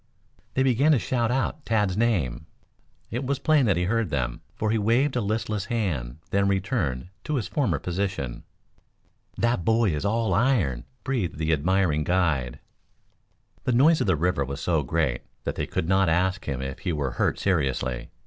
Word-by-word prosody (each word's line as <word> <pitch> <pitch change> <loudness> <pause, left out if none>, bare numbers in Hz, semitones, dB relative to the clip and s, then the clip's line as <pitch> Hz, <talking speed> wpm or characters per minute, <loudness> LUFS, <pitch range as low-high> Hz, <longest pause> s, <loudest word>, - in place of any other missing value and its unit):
They 130 - +3
began 135 +4 +4
to - - +4
shout 120 0 0
out 135 +4 -1
Tad's 105 -5 +1
name. 80 - 0 0.6
It 120 +4 -2
was 140 +1 0
plain 150 -3 +3
that 95 -5 +3
he 90 - +1
heard 115 +2 0
them, 60 -5 -2
for 110 0 -1
he 110 - +2
waved 120 +7 +2
a 125 - +1
listless 105 -1 -2
hand 80 - -2
then 100 0 +2
returned 95 - -1 0.2
to 150 - -1
his 120 -6 -1
former 125 - 0
position. 90 -7 -3 0.9
"That 120 -6 +1
boy 110 0 +3
is 75 +1 -2
all 110 -1 +1
iron," 90 - +1 0.2
breathed 115 - -2
the 80 0 +1
admiring 80 0 +2
guide. 80 -8 0 1.1
The 125 - +2
noise 155 +7 +5
of - - 0
the 95 - +4
river 85 -1 +1
was 70 +1 -5
so 80 -2 +1
great 70 -2 0 0.2
that - - -2
they - - -3
could 80 - -2
not 95 -1 +3
ask 95 +4 +1
him 65 -2 -3
if 65 0 -5
he 90 - -2
were 70 -4 -1
hurt - - 0
seriously. 65 -8 -1
95 Hz, 175 wpm, -25 LUFS, 75-115 Hz, 1.1 s, noise